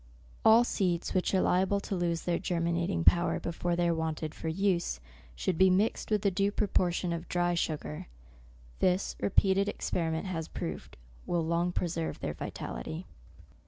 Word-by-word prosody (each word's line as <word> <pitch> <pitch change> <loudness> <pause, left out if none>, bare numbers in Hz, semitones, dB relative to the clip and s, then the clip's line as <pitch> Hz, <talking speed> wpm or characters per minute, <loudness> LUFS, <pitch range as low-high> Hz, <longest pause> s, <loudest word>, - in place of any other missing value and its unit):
All 225 +2 +7
seeds 180 -7 -1
which 185 - +1
are 185 - +4
liable 190 +2 +2
to 200 - -3
lose 170 -2 -1
their 175 -1 0
germinating 170 - 0
power 170 - +4
before 170 +1 -2
they 175 0 +1
are 170 - +3
wanted 160 -1 -3
for - - -6
use, 175 - 0 0.4
should 160 - -1
be 190 0 +7
mixed 195 +4 +1
with 210 -2 0
a 200 - +4
due 200 +2 +1
propor 190 -4 +1
tion 175 0 -2
of 170 +1 -6
dry 175 0 +1
sugar. 150 - -3 0.7
This, 185 +1 +1
repeated 195 0 +3
experi 170 -5 -1
ment 160 +3 -2
has 165 -4 -3
proved, - - -6 0.3
will 170 -2 0
long 170 +2 +1
preserve 170 -2 -2
their - - -3
vitality. - - -6
175 Hz, 165 wpm, -30 LUFS, 165-190 Hz, 0.7 s, All